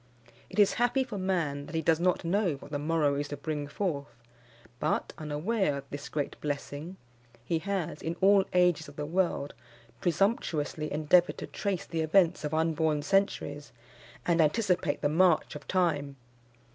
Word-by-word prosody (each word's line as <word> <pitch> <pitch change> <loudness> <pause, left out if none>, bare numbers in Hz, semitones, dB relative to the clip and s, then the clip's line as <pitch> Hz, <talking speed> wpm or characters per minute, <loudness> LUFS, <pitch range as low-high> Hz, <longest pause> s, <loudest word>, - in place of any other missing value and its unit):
It - - -10
is 205 -2 +5
happy 245 +2 +3
for 225 -6 -6
man 165 -7 -1
that 165 - -7
he 160 - +1
does 160 +1 +3
not 180 0 +1
know 180 -2 +1
what 135 - -13
the 145 - -2
morrow 150 -1 +1
is 145 +1 -2
to 145 - -6
bring 150 0 -3
forth; 145 - -3 0.6
but, 155 - -1
unaware 155 +2 0
of 140 - -6
this 145 0 -6
great 145 -2 -3
blessing, 145 +4 -4 0.5
he 165 +5 0
has, 180 -3 -3
in 165 +1 -3
all 195 0 +5
ages 180 -4 +3
of 145 - -12
the 150 - -4
world, 170 -3 0 0.5
presumptuously 165 -5 0
endeavoured 155 +4 +3
to - - -5
trace 200 -3 -3
the 165 - -2
events 170 +2 +3
of 150 - -2
unborn 160 -1 +1
centuries, 150 -6 0 0.5
and 170 -1 +3
anticipate 175 -3 +1
the - - +4
march 170 +2 +3
of 145 -2 -9
time. 145 -7 0
160 Hz, 165 wpm, -29 LUFS, 145-185 Hz, 0.6 s, is